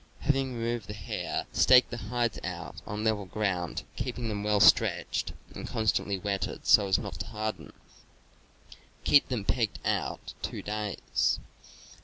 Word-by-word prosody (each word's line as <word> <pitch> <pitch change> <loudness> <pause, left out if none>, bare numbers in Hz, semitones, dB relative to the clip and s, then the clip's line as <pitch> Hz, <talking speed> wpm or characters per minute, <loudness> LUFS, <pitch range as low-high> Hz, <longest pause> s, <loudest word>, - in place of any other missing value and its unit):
Having 135 -3 +1
removed 115 -3 -2
the 105 - -6
hair, 100 - -3
stake 125 -1 +6
the 120 - -4
hides 120 +2 -1
out - - -6
on 105 +1 -3
level 110 -3 +1
ground, 95 -4 -2
keeping 125 -2 -3
them 105 -1 -3
well 105 -1 +2
stretched 95 -2 +4 0.2
and - - -6
constantly 105 -2 0
wetted 100 +1 -3
so 100 -2 +6
as 95 0 +3
not - - -6
to 100 - -4
harden; 110 0 -4 1.3
keep 145 - +5
them 120 -6 -3
pegged 115 -4 0
out - - -2
two - - -4
days. 105 -1 -1
105 Hz, 145 wpm, -29 LUFS, 100-120 Hz, 1.3 s, stake